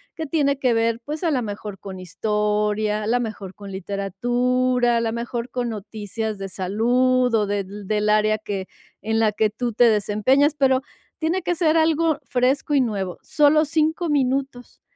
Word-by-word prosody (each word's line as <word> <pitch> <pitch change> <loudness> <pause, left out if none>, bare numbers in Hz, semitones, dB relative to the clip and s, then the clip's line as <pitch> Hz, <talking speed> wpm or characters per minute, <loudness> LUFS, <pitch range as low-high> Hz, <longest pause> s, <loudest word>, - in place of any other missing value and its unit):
que 320 - -4
tiene 280 -2 +1
que 250 -3 +2
ver, 230 0 +1
pues, 300 +5 -5
a 330 - +2
la 255 -3 +1
mejor 205 -2 -6
con 190 -2 -8
historia, 210 +3 -1
a 210 - -3
la 245 +2 +2
mejor 210 -5 -6
con 200 -1 -10
literatura, 240 +6 0
a - - +1
la 225 -1 -1
mejor 235 +1 -4
con 245 -1 -2
noticias 215 0 -5
de 195 0 -5
salud, 245 +6 +1
o 215 -2 +3
del 205 -1 -1
del 200 -1 -9
del 210 0 0
área 215 0 +3
que 200 -3 -5 0.3
en 220 +2 -1
la 220 -1 +3
que 215 0 +2
tú 235 +1 -3
te 240 +2 +5
desempeñas, 220 +8 +2
pero 265 -2 +3 0.4
tiene 340 +4 0
que 350 +1 -1
ser 325 -1 +2
algo 320 -1 +2
fresco 265 +3 0
y 275 - +5
nuevo, 195 -6 -2
solo 305 +1 +4
5 320 +3 0
minutos. 270 -2 -1
230 Hz, 180 wpm, -22 LUFS, 210-270 Hz, 0.4 s, te